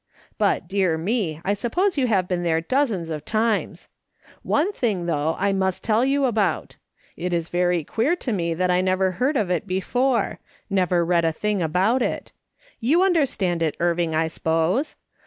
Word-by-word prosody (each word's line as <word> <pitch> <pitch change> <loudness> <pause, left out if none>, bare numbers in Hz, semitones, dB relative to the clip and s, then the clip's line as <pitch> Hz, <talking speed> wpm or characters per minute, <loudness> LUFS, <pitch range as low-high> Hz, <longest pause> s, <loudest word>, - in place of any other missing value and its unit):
But, 330 - +1
dear 190 -3 +1
me! 175 -3 -1
I 200 - +2
suppose 350 - 0
you 265 -4 +1
have 190 -5 +1
been 180 -1 -1
there 165 -2 +1
dozens 200 - -1
of 150 -2 -4
times. 220 +2 -1 0.5
One 350 +8 0
thing, 205 - -1
though, 160 -1 0
I 200 0 +1
must 190 -1 -1
tell 220 +2 +2
you 275 +1 +2
about. 210 -8 0 0.4
It 180 +1 -3
is 170 -1 -1
very 175 -1 +1
queer 240 - 0
to 260 -9 -3
me 170 -4 -1
that 180 +1 +1
I 180 0 +3
never 185 0 +1
heard 260 +10 0
of 200 -6 0
it 180 +2 -1
before; 245 +7 0 0.3
never 180 -3 +2
read 170 0 +2
a 165 - +2
thing 210 +4 -1
about 185 +10 +1
it. - - -2 0.5
You 305 +10 +3
understand 260 - +1
it, 160 -2 0
Irving, 170 -1 0
I 160 +1 +2
s'pose 165 - 0
190 Hz, 175 wpm, -23 LUFS, 170-235 Hz, 0.5 s, I